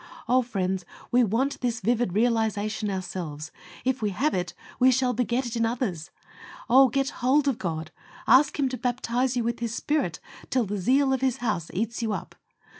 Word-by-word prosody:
Oh! 255 +1 +4
friends, 190 -6 -2 0.3
we 245 +1 +5
want 240 +6 0
this 240 -2 -1
vivid 230 -2 0
realization 215 -1 0
ourselves. 175 -5 -5 0.3
If 260 -1 0
we 210 - +1
have 275 +11 0
it 180 -1 -2 0.2
we 255 - +6
shall 255 0 +2
beget 245 +2 0
it 240 0 -4
in 230 - +1
others. 225 - -2 0.6
Oh! 265 +2 +6
get 270 +1 0
hold 275 +4 +3
of 265 -4 0
God. 160 -4 -4 0.3
Ask 280 +4 +5
Him 280 -2 +2
to 255 - -4
baptize 250 +1 -1
you 240 - +1
with 235 +1 -2
His 230 -1 -3
Spirit 280 - -1 0.3
"till 255 -3 +1
the 205 0 -3
zeal 265 +7 +3
of 260 - -1
His 260 -1 +1
house 215 -10 -2
eats 225 +5 -2
you 220 -2 -1
up." - - -6
235 Hz, 190 wpm, -26 LUFS, 205-255 Hz, 0.6 s, we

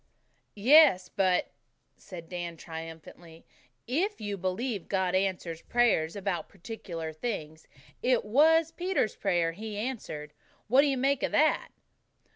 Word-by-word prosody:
"Yes, 235 - +6
but," 185 -2 +1 0.4
said 170 -3 -11
Dan 175 -1 -5
triumphantly, 165 0 -10 0.4
"if 360 - -1
you 205 -1 -3
believe 195 +3 -3
God 190 -2 0
answers 185 -3 -1
prayers 225 -9 +1
about 195 -3 -3
particular 170 -5 -7
things, 160 -5 -5 0.3
it 250 -3 +2
was 320 +8 +4
Peter's 360 - -1
prayer 175 -4 +1
He 210 +4 -7
answered. 205 - -5 0.3
What 255 +5 +6
do 295 - +2
you 275 -2 0
make 275 +1 +1
of - - -1
that?" 310 +1 +3
195 Hz, 125 wpm, -29 LUFS, 170-250 Hz, 0.4 s, Yes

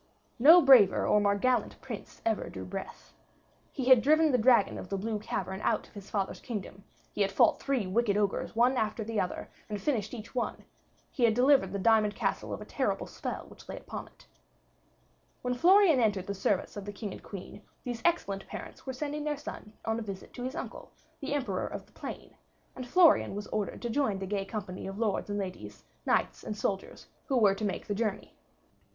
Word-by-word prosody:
No 320 +7 +9
braver 250 -8 +7
or 210 - +4
more 200 0 +3
gallant 245 +1 0
prince 235 -6 -9
ever 225 -2 0
drew 95 -1 -7
breath. 90 - -8 0.6
He 260 - -4
had 255 -2 +7
driven 310 +3 +4
the 250 - +3
dragon 235 -2 +4
of 180 - -9
the 195 - -1
blue 215 +2 -2
cavern 190 -1 -4
out - - 0
of - - -24
his 200 -1 -10
father's 195 -2 -2
kingdom; 200 -4 -6 0.3
he - - -2
had 195 -1 +2
fought 195 - +4
three 270 -7 0
wicked 205 +2 +1
ogres 205 0 -1
one 245 +3 +3
after 220 0 -1
the 220 0 -2
other, 180 - -3 0.2
and 210 -1 -3
finished 220 -2 -1
each 225 -1 -9
one; 250 - -3 0.5
he 250 - -2
had 225 -2 +5
delivered 255 -6 +4
the 200 - -2
diamond 215 0 +3
castle - - -2
of - - -4
a - - -7
terrible - - -1
spell - - -5
which - - -16
lay - - -5
upon - - -7
it. - - -21 1.2
When 250 0 0
Florian 350 +2 +5
entered 205 -5 +1
the 200 - -3
service 195 0 -1
of 205 -1 -6
the 205 - -5
King 205 0 -5
and - - -9
Queen, 200 +1 -9 0.2
these 240 -2 -4
excellent 200 - 0
parents - - -9
were 260 - -2
sending 295 +3 -4
their 300 -1 -1
son 210 -6 -8
on 225 0 0
a - - -5
visit 195 -3 -7
to 245 - -8
his 260 +1 -4
uncle, - - -7 0.3
the 285 +1 -2
Emperor 220 -10 -1
of - - -7
the - - -27
Plain, - - -8 0.4
and 255 -1 -7
Florian 335 - +5
was 205 0 -4
ordered 210 +2 -3
to 240 - -2
join 225 -6 +1
the 190 - -4
gay 195 0 -2
company 195 -3 -6
of 195 +1 -6
lords 215 -2 -1
and 205 - -2
ladies, 145 - -6 0.2
knights - - +1
and 210 - -5
soldiers, 195 -2 -3 0.2
who 270 -4 +1
were 205 -4 +5
to 200 - -6
make 200 - -2
the 205 - -2
journey. 210 -1 -2
215 Hz, 210 wpm, -30 LUFS, 200-255 Hz, 1.2 s, No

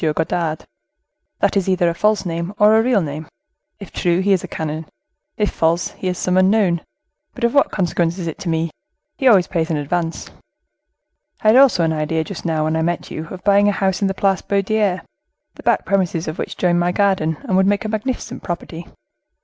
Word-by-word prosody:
Godard. 160 -1 -1 0.8
That - - +2
is 195 -1 +1
either 180 -2 +2
a 170 - +1
false 210 +3 +1
name 170 +3 -4
or 210 +1 +5
a 220 - +5
real 230 -5 +2
name; 150 +1 -6 0.5
if 200 - -10
true, 175 0 +1
he 200 +1 +3
is 185 - 0
a - - -5
canon; 155 0 -5 0.5
if 210 -1 0
false, 165 +1 +1
he 185 - -6
is 180 -1 -1
some 185 0 0
unknown; 185 -3 +3 0.5
but 250 - -8
of 235 - +2
what 280 - +4
consequence 175 -2 0
is 180 - -4
it 165 - -5
to 175 - -4
me? 165 0 -1 0.5
he 265 - +2
always 195 -7 +6
pays 165 -2 -2
in 160 - 0
advance. 165 +3 -3 1.1
I 215 - +4
had 220 - +6
also 260 -10 +5
an 160 -1 +1
idea 155 +1 -1
just 185 +2 -8
now, 160 -2 0
when 155 +1 0
I 160 - 0
met 170 +1 -2
you, 160 +1 -5
of 185 +1 -9
buying 200 0 +4
a - - +4
house 195 -1 -1
in 200 - +2
the 195 - -2
Place 195 -1 +1
Baudoyer, 200 -2 0 0.5
the - - -13
back - - +1
premises 180 -4 0
of 155 - -5
which - - -4
join 175 -1 +2
my 175 0 +1
garden, 185 -6 +1
and 215 -9 -1
would 190 0 +4
make 205 +3 +1
a - - -2
magnificent 220 +4 -4
property. 170 -1 -6
180 Hz, 215 wpm, -19 LUFS, 165-200 Hz, 1.1 s, always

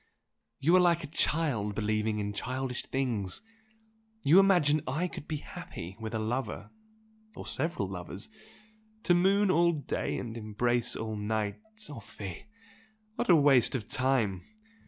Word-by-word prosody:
You 165 +6 +4
are - - +7
like 170 -2 +3
a 155 0 -9
child 130 -13 +1
believing 110 0 0
in 105 -1 -2
childish 130 +3 -3
things! 115 -8 -1 0.8
You 165 +7 +7
imagine 175 -7 +4
I 155 +8 0
could 150 - -9
be 155 - -2
happy 90 -9 -8
with 110 0 -4
a - - +1
lover 120 +5 -3 0.6
or - - -8
several 155 - -1
lovers! 95 +2 -6 0.8
To 175 - +4
moon 195 +3 +4
all 170 0 +4
day 150 -3 -2
and 115 -2 -5
embrace 115 +2 0
all 110 -1 -3
night! 105 - -2 0.3
Oh 145 -5 -8
fie! 100 - -8 0.7
What 240 0 -3
a 175 - +9
waste 140 -5 +5
of 115 -4 -3
time! 120 -8 +1
125 Hz, 145 wpm, -30 LUFS, 105-160 Hz, 0.8 s, a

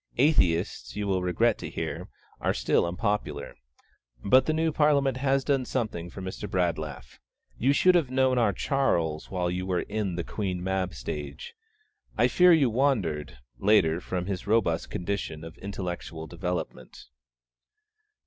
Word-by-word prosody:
Atheists, 100 - +2
you 105 - -2
will 95 -2 0
regret 100 +6 +1
to - - -5
hear, - - -4 0.3
are - - 0
still - - +2
unpopular; 100 +4 -2 0.7
but 130 +6 +5
the - - +3
new 160 +1 +1
Parliament 140 -4 +2
has 135 0 +1
done 135 -2 +1
something 110 -10 -3
for 95 +2 -8
Mr. 95 +2 -5
Bradlaugh. 85 -7 -1 0.6
You 130 +4 +3
should 185 +6 +5
have 165 -7 +2
known 130 -1 +2
our 110 -4 +3
Charles 85 - 0
while 90 -2 -1
you 90 +1 -3
were 90 -2 0
in 100 -4 -3
the 85 - -2
'Queen 95 -3 -3
Mab' 95 -1 -1
stage. 70 +3 -6 0.6
I - - +5
fear 180 0 +6
you 145 -8 +4
wandered, 100 - 0 0.2
later, 90 - +3
from 90 -1 -3
his 95 -1 -4
robust 100 -7 +1
condition 90 -4 -3
of 80 0 -9
intellectual 90 -4 -5
development. 90 -8 -5
95 Hz, 150 wpm, -27 LUFS, 85-130 Hz, 0.7 s, fear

